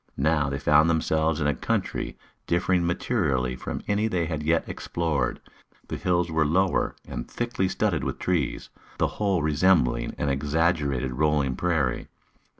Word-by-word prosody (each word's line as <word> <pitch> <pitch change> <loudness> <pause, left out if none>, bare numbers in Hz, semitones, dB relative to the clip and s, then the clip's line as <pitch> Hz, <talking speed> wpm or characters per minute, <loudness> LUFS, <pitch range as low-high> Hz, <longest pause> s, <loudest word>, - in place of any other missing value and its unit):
Now 75 0 +2
they 70 - -2
found 75 +3 +4
themselves 80 -1 +1
in 75 - 0
a 75 - +3
country 65 - -2 0.3
differing 90 0 +1
materially 75 - 0
from - - -5
any 105 +1 +1
they 90 -6 0
had 80 -2 -3
yet 80 +2 +1
explored. 75 -7 -2 0.5
The - - -3
hills 90 -2 0
were 80 0 +2
lower 90 +5 +1
and - - -6
thickly 120 -5 -1
studded 90 -11 0
with - - -3
trees, 85 -8 -1 0.3
the - - +2 0.2
whole 95 -6 +2
resembling 75 -3 +2
an - - -1
exaggerated 70 -2 0
rolling 75 -4 +2
prairie. 80 -6 0
80 Hz, 150 wpm, -26 LUFS, 70-90 Hz, 0.5 s, found